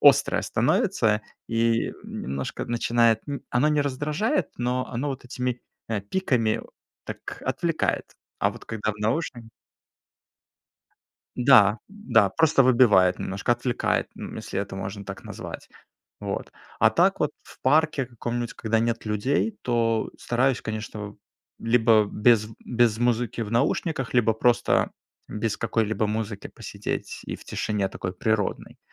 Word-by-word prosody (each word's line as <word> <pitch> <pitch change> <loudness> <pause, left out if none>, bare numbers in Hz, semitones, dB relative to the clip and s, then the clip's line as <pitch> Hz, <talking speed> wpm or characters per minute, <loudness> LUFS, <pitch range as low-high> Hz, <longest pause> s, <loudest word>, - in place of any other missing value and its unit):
острое - - +5
становится 105 -1 +2 0.3
и, 115 0 +1
немножко 70 +1 -4
начинает 115 -1 +2
н 140 - -4
Оно 125 +5 +3
не 150 -1 +2
раздражает, 150 - 0
но 125 +1 0
оно 130 +5 -2
вот 135 -2 -5
этими, 125 0 -3 0.3
э, 110 -3 -1
пиками, 115 - 0 0.4
так - - -7
отвлекает. - - -1 0.3
А - - +3
вот - - -12
когда 110 -1 -2
в 105 - -8
наушнике 115 +1 -2 1.9
Да, 120 -5 +6
да, 210 +2 +2
просто 160 -4 +4
выбивает 115 -8 +5
немножко, 100 +5 0
отвлекает, 120 0 0
эм, - - -7
если - - -4
это 100 -1 -3
можно 95 +1 -5
так 95 0 -8
назвать. - - -8 0.5
Вот. - - -4 0.3
А - - +7
так - - +3
вот - - +2
в - - -17
парке 150 -1 +3
каком-нибудь, 120 0 -4
когда 115 -1 0
нет 115 0 -1
людей, 130 - 0
то 115 -2 +1
стараюсь, 125 +1 +1
конечно, 105 -1 -5 0.4
либо 115 -2 +4
без 110 -1 +4 0.2
без 120 -2 +2
музыки 120 -1 0
в 105 - -5
наушниках, 135 +1 0
либо 115 -2 +4
просто 120 +2 +2 0.4
без 105 0 -2
какой-либо 110 -1 0
музыки 105 0 -3
посидеть - - -5
и - - -4
в - - -16
тишине 100 -2 -1
такой 90 0 -5
природной. 110 +1 -1
115 Hz, 135 wpm, -25 LUFS, 110-125 Hz, 1.9 s, А